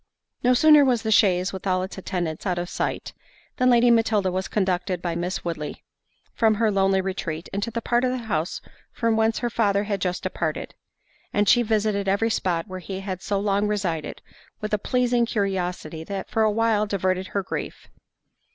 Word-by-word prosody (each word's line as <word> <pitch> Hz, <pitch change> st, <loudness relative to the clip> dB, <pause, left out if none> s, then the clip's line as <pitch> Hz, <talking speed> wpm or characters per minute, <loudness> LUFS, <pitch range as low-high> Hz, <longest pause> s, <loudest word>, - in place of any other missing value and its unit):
No 250 Hz, +1 st, +4 dB
sooner 300 Hz, +1 st, +7 dB
was 245 Hz, -4 st, +2 dB
the 220 Hz, -, -1 dB
chaise, 185 Hz, -3 st, +3 dB
with 190 Hz, +1 st, -6 dB
all 185 Hz, 0 st, +1 dB
its 190 Hz, -, -6 dB
attendants, 175 Hz, -2 st, -3 dB
out 180 Hz, -1 st, 0 dB
of 175 Hz, 0 st, -4 dB
sight, -, -, -3 dB, 0.4 s
than 255 Hz, 0 st, +3 dB
Lady 240 Hz, 0 st, +5 dB
Matilda 220 Hz, -4 st, +2 dB
was 185 Hz, +1 st, -2 dB
conducted 185 Hz, -2 st, -1 dB
by 175 Hz, -1 st, -3 dB
Miss 180 Hz, +3 st, -3 dB
Woodley 155 Hz, -3 st, -5 dB, 0.5 s
from 220 Hz, -2 st, +3 dB
her 220 Hz, 0 st, +2 dB
lonely 195 Hz, -1 st, +2 dB
retreat, 185 Hz, -3 st, -4 dB
into 200 Hz, +3 st, -2 dB
that 230 Hz, 0 st, -4 dB
part 240 Hz, +1 st, +1 dB
of 255 Hz, -, +2 dB
the 255 Hz, -, -1 dB
house 165 Hz, -5 st, -2 dB, 0.3 s
from 230 Hz, -2 st, 0 dB
whence 220 Hz, 0 st, +2 dB
her 240 Hz, -, -1 dB
father 205 Hz, -3 st, +2 dB
had 200 Hz, -2 st, -3 dB
just 180 Hz, -1 st, -2 dB
departed—and 205 Hz, 0 st, -4 dB
she 240 Hz, -, +6 dB
visited 215 Hz, -3 st, 0 dB
every 200 Hz, +4 st, +2 dB
spot 180 Hz, -4 st, -1 dB
where 185 Hz, -1 st, -6 dB
he 190 Hz, +2 st, -6 dB
had 190 Hz, -2 st, -5 dB
so 200 Hz, 0 st, -1 dB
long 200 Hz, 0 st, +1 dB
resided, 190 Hz, -7 st, -3 dB, 0.4 s
with 215 Hz, 0 st, -4 dB
a 210 Hz, -, +2 dB
pleasing 245 Hz, +1 st, +1 dB
curiosity 180 Hz, -6 st, -2 dB
that 195 Hz, +2 st, -6 dB
for 225 Hz, -, +1 dB
a 215 Hz, -, +4 dB
while 215 Hz, -1 st, +1 dB
diverted 185 Hz, -1 st, -1 dB
her 200 Hz, 0 st, -2 dB
grief. -, -, -6 dB
200 Hz, 190 wpm, -24 LUFS, 185-225 Hz, 0.5 s, sooner